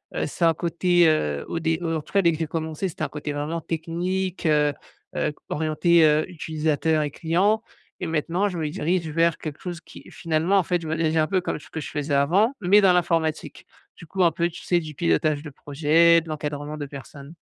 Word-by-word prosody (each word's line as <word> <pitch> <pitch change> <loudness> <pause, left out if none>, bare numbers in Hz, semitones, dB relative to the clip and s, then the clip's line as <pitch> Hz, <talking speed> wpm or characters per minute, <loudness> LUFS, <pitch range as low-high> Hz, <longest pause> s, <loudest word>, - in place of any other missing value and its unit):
heu, - - 0
ça 170 - +1
a - - +6
un - - -2
côté, 175 +1 +2
heu, 75 - 0
au 165 - -3
dé 160 0 0
heu, 165 -1 -1
en - - -4
tout - - -18
cas, 200 -1 +3
dès 170 - +5
que 160 - -5
j'ai 160 - -1
commencé 160 +3 -3
c'était 155 - -6
un - - 0
côté 150 0 -5
vraiment 155 +3 -3
technique, 175 +3 -3
heu 150 -1 +3 0.4
heu, - - 0
c 150 - -9
orienté, 160 +2 +2
heu, 150 0 +3
utilisateurs 160 -2 -1
et 145 - -3
clients 190 +8 +1 0.4
et 180 - -3
maintenant 165 +5 0
je 180 -4 -4
me 155 - -1
dirige 170 0 -1
vers 165 +1 +1
quelque 155 -2 -6
chose 175 -1 -6
qui - - -14
finalement, 165 +4 +1
en - - +4
fait, 175 +1 0
je - - -6
me 160 - -1
dirige 160 0 0
un 155 - +4
peu 185 +3 0
comme - - -3
ce - - -15
que 160 - -4
je - - -6
faisais 145 -1 -3
avant 180 - +3
mais 190 +3 +5
dans 185 -2 +5
l'informatique. 165 -3 -1 0.3
Du - - -13
coup, 190 +3 0
un 170 - +4
peu, 170 +2 0
tu 170 - -11
sais, 175 - +2
du 155 -2 -8
pilotage 140 - +1
de 150 - -8
projets, 160 +4 +3
de 165 - -12
l'encadrement 150 0 -4
de 145 - -4
personnes. 140 +2 -11
160 Hz, 235 wpm, -24 LUFS, 150-175 Hz, 0.4 s, a